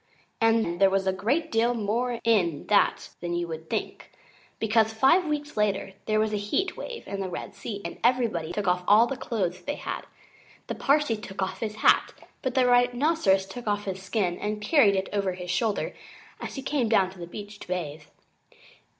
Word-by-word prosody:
And 225 -6 +2
there 195 - +7
was 195 0 +1
a 190 - +2
great 235 - 0
deal 235 +2 +2
more 235 +3 -1
in 180 -10 +2
that 210 - +3
than 175 0 -3
you 175 0 -1
would 160 0 -7
think. - - -4 0.5
Because, 220 0 +2
five 270 +11 +4
weeks 295 -1 -3
later, 200 -2 0
there 215 0 +2
was 215 0 +1
a - - +1
heat 210 - -1
wave 480 -2 -7
in 200 0 -4
the 190 - -3
Red 180 - -6
Sea, 200 0 -6
and 170 - -6
everybody 230 -10 +1
took 200 +2 -3
off 180 0 +2
all 215 +3 +7
the 270 - -3
clothes 185 -8 -2
they 290 +11 -3
had. - - -5 0.6
The - - -4
Parsee 280 -5 +2
took 195 -1 -4
off 190 - -4
his 215 -2 -3
hat; - - +5 0.3
but 260 -2 -2
the 260 -1 +4
Rhinoceros 245 -4 +3
took 225 +5 -9
off 205 0 0
his 190 -1 -4
skin 190 -3 -1
and 210 0 -2
carried 210 -2 +4
it 190 0 -1
over 200 -2 0
his 180 0 -5
shoulder 210 +3 0 0.5
as - - -6
he 270 - -5
came 270 -5 0
down 195 -4 +3
to 190 - -15
the 170 - -6
beach 205 +3 -9
to - - -11
bathe. 160 -4 -4
210 Hz, 200 wpm, -27 LUFS, 190-240 Hz, 0.6 s, there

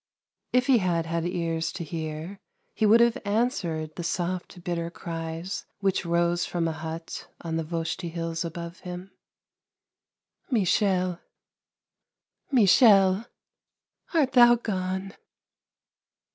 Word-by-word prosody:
If 250 0 +3
he 265 -4 +5
had 170 -4 0
had 165 +1 -1
ears 165 -2 -1
to 175 - -5
hear, 160 +3 -5 0.3
he 215 - +2
would 225 +3 +7
have 235 -1 +3
answered 200 - -1
the 175 - -5
soft, 175 0 -3
bitter 170 -1 -2
cries 165 +2 -5
which 195 -3 0
rose 170 0 +2
from 170 -2 -1
a - - 0
hut 160 +1 -6
on 165 -1 -3
the 165 - 0
Voshti 165 +2 -3
Hills 165 0 -3
above 170 +1 -6
him: 180 +1 -8 0.8
" - - -49
Michel, 185 - +2 1.3
Michel, 205 -3 +5 0.9
art 285 -5 +3
thou 240 -1 +7
gone? 190 -3 -3
175 Hz, 115 wpm, -26 LUFS, 165-200 Hz, 1.3 s, would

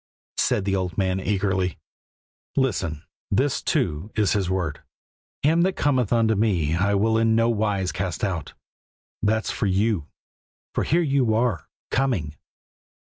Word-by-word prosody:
said 100 - +1
the 100 -1 +1
old 90 -2 -2
man 95 -1 +1
eagerly. 95 -2 0 0.8
"Listen; 95 - 0 0.3
this, - - +1
too, 75 +9 -1
is 105 -3 +2
His 95 -3 0
word: 85 -6 -2 0.6
'Him 160 +4 +4
that 185 +2 +2
cometh 130 -7 +1
unto 115 -2 +3
Me 95 -8 +1
I 100 +3 +2
will 110 +3 +2
in 115 0 +3
no 115 +1 +3
wise 105 -4 0
cast 95 -2 -3
out.' 90 -7 -2 0.7
That's 110 +1 +1
for 105 - -1
you, 95 -4 +1 0.7
for - - 0
here 170 +3 +2
you 135 -7 +2
are, 115 -7 0 0.2
coming." 110 - 0
100 Hz, 145 wpm, -24 LUFS, 95-115 Hz, 0.8 s, Him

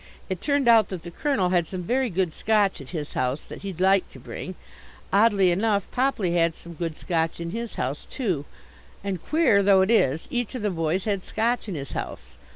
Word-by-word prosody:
It 185 - -3
turned 285 -3 +1
out 225 -4 +6
that 185 -4 -6
the 175 - -8
Colonel 210 - 0
had 175 -2 +2
some 185 0 -5
very 255 +6 +1
good 180 -3 0
Scotch 210 -6 +1
at 135 - -11
his 155 -4 -5
house 130 +3 -1
that - - -10
he'd 195 -4 -6
like 190 0 +3
to - - -11
bring; 185 - -7 0.6
oddly 200 -3 +5
enough 200 +2 +1
Popley 245 -9 +1
had 165 -1 +2
some 170 - -11
good 165 -1 -4
Scotch 165 -2 -1
in 170 0 -4
his 230 +2 -5
house 130 +3 -3
too; 185 - -2 0.6
and, 195 -4 -3
queer 305 -11 +3
though 195 -1 +5
it 190 +4 +2
is, 155 - +3
each 245 0 -2
of 245 - -4
the 210 - +1
boys 165 +2 0
had 200 -3 -1
Scotch 230 0 -1
in 185 - -3
his 140 -2 -6
house. 65 +2 -6
190 Hz, 210 wpm, -25 LUFS, 170-220 Hz, 0.6 s, out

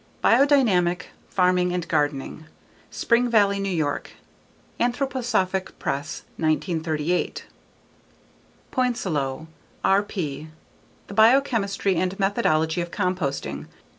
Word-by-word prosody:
_Biodynamic 225 - +4 0.3
Farming 180 -1 +2
and 175 -1 -2
Gardening. 145 +1 -1 0.4
_Spring 240 +1 +2
Valley, 200 -3 +3
New 195 0 -1
York: 155 -6 -2 0.7
Anthroposophic 240 -7 -1
Press, 140 +2 -3
1938. 160 0 -1 1.3
Poincelot, 160 - -1 0.4
R.P. 180 -7 0 0.6
_The 200 - -9
Biochemistry 220 -4 +3
and 185 +1 -1
Methodology 175 -5 +1
of 175 - -4
Composting. 140 - -2
185 Hz, 80 wpm, -24 LUFS, 160-220 Hz, 1.3 s, Biodynamic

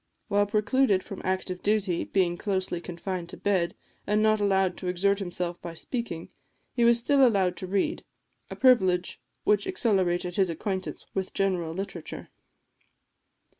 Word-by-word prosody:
While 205 0 +3
precluded 210 0 +2
from 195 - -8
active 185 -1 -2
duty, 200 -4 +1
being 180 -3 +1
closely 185 -2 -2
confined 175 0 -5
to - - -8
bed, 185 -4 0 0.3
and 210 +1 +2
not 215 0 +4
allowed 190 -3 +2
to 185 - -5
exert 195 +3 +1
himself 175 -2 -3
by 170 -1 -7
speaking, 175 -5 -4 0.4
he 240 - +1
was 235 0 +6
still 275 +3 +3
allowed 195 -7 +3
to 185 - -5
read; 195 +1 0 0.5
a - - -6
privilege 190 -9 +3 0.2
which 205 -1 +2
accelerated 185 - +1
his 190 -2 +3
acquaintance 190 +3 -4
with 190 -1 -3
general 180 -4 0
literature. 195 +2 -6
190 Hz, 145 wpm, -27 LUFS, 180-205 Hz, 0.5 s, was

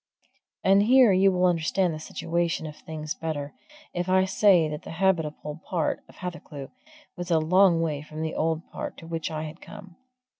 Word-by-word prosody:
And 195 +1 +5
here 245 +1 +6
you 190 +1 +5
will 180 0 +2
understand 175 +1 +1
the 155 - -6
situation 165 +1 -2
of 150 -1 -7
things 155 -1 -6
better, 150 -3 -4 0.4
if 175 +1 -2
I 190 0 +4
say 190 -3 +4
that 150 0 -5
the - - -9
habitable 160 -4 0
part 170 -4 -1
of - - -16
Hathercleugh 165 -6 -7 0.4
was 175 -1 -6
a 165 - +4
long 170 +2 +4
way 150 -3 -1
from 155 +1 -7
the 160 - -3
old 160 +1 -1
part - - -6
to 165 - -11
which 165 0 -3
I 155 -1 -4
had 160 +2 -8
come. 195 -4 -12
165 Hz, 185 wpm, -26 LUFS, 155-185 Hz, 0.4 s, here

